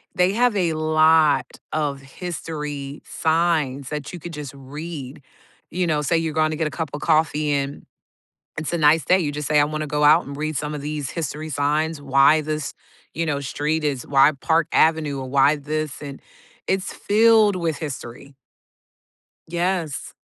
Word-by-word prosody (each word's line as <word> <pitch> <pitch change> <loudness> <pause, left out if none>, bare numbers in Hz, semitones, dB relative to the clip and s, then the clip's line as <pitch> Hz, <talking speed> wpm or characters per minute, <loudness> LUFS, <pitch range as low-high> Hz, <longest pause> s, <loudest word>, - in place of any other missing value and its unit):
they 180 +1 +3
have 240 0 +2
a 170 -4 +1
lot 155 0 +4 0.3
of 145 -3 -1
history 150 -2 -6
signs 160 -5 0
that 150 -1 -5
you 175 - -6
could 170 +2 -8
just 150 -4 -6
read. 140 0 -8 0.5
You 180 -1 -1
know, 150 -2 +1
say 155 +3 +1
you're 160 -1 -1
going 155 0 +2
to 155 - -3
get 160 -1 0
a - - -6
cup 160 -3 -4
of 145 - -4
coffee, 155 -1 +2
and 140 0 -3 0.7
it's 160 0 -3
a 170 - 0
nice 150 0 +4
day, 185 +5 +4
you 145 -3 -1
just 150 0 -4
say, 150 -1 +4
"I - - +5
wanna 155 +1 -3
go 150 0 -1
out, 155 +4 +6
and 140 - -7
read 155 0 -3
some 150 +2 -3
of 145 - -5
these 150 -2 -4
history 155 -1 -4
signs, 150 +2 0
why 135 +3 +5
this, 155 -1 -3 0.4
you 165 0 -1
know, 145 -3 -1
street 150 +3 -2
is 140 -4 -2
why 140 +2 +5
Park 165 0 +2
Avenue, 155 -3 +2
or 130 - -6
why 140 +2 +4
this?" 150 0 -4
and, 140 -1 -8 0.5
it's 190 0 0
filled 220 -1 +4
with 165 -4 -1
history. 140 -2 -7 1.1
Yes. 175 -3 -2
155 Hz, 180 wpm, -22 LUFS, 145-165 Hz, 1.1 s, out